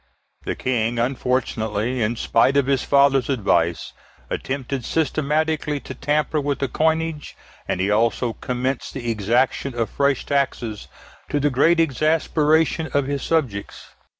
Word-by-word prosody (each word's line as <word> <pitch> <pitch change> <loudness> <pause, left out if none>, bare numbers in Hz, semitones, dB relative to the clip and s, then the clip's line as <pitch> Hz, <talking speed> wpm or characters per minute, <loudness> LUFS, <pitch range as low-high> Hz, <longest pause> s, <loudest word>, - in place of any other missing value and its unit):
The - - -2
King 120 -2 -1
unfortunately, 120 -2 -1
in 115 +2 0
spite 120 +4 +2
of 140 - +3
his 135 -2 +1
father's 140 -2 +3
advice, 85 -9 0 0.4
attempted 135 -1 -3
systematically 155 0 0
to - - -8
tamper 150 +3 0
with 140 0 -1
the 135 - -1
coinage, 160 +2 -1 0.3
and - - -1
he 95 +2 +1
also 115 +2 +1
commenced 125 +2 -3
the 120 -3 -2
exaction 120 +5 0
of 115 -2 -1
fresh 140 -2 +1
taxes, 130 -6 -2 0.4
to 145 - 0
the 145 0 +1
great 165 +7 +3
exasperation 160 +1 +2
of 140 -1 +2
his 140 0 -2
subjects. 130 -12 -2
135 Hz, 135 wpm, -22 LUFS, 120-150 Hz, 0.4 s, of